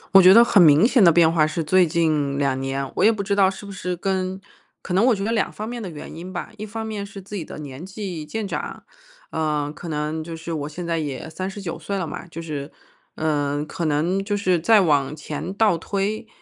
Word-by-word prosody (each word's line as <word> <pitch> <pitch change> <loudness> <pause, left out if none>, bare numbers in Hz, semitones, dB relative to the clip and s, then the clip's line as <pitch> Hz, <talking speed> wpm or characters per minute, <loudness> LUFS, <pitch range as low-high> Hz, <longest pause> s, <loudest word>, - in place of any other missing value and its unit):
我 190 - +11
觉 185 +1 +8
得 230 +4 +9
很 205 -4 +5
明 160 +6 +7
显 245 -6 +4
的 170 - +8
变 165 0 +5
化 155 -2 +4
是 160 +2 -2
最 180 +3 +4
近 155 -4 +1
两 135 -2 0
年， 135 0 -3
我 - - +2
也 220 - +7
不 215 -3 -3
知 200 0 0
道 195 -2 +5
是 195 +1 -8
不 200 - -8
是 180 -1 -3
跟 190 +1 -2 0.4
可 180 - -4
能 195 +5 +4
我 245 - +4
觉 195 - -4
得 225 - -1
两 220 -4 0
方 215 - -6
面 240 0 -5
的 195 - -5
原 155 -1 -9
因 180 +3 -8
吧。 180 +3 -5
一 215 - -5
方 220 +1 -5
面 215 -2 -4
是 200 0 -9
自 200 +2 -9
己 180 - -3
的 - - -9
年 145 0 -8
纪 190 -4 -6
渐 205 +8 -4
长， - - -5 0.5
呃， 150 -2 -1
可 170 +1 -9
能 155 +1 -2
就 165 +1 -7
是 165 +1 -6
我 145 -1 -3
现 175 +3 -6
在 165 -1 -1
也 145 -1 -4
39 185 0 -5
岁 180 +5 -3
了 185 - -2
嘛， 160 - -7
就 165 0 -8
是 145 -2 -5 0.4
嗯， 145 -1 -1
可 170 +1 -4
能 165 +6 +1
就 205 0 -1
是 185 -4 +2
再 210 +4 +5
往 145 -3 +2
前 150 +4 -5
倒 215 -4 +3
推， 205 +5 -2
175 Hz, 255 characters per minute, -23 LUFS, 155-200 Hz, 0.5 s, 我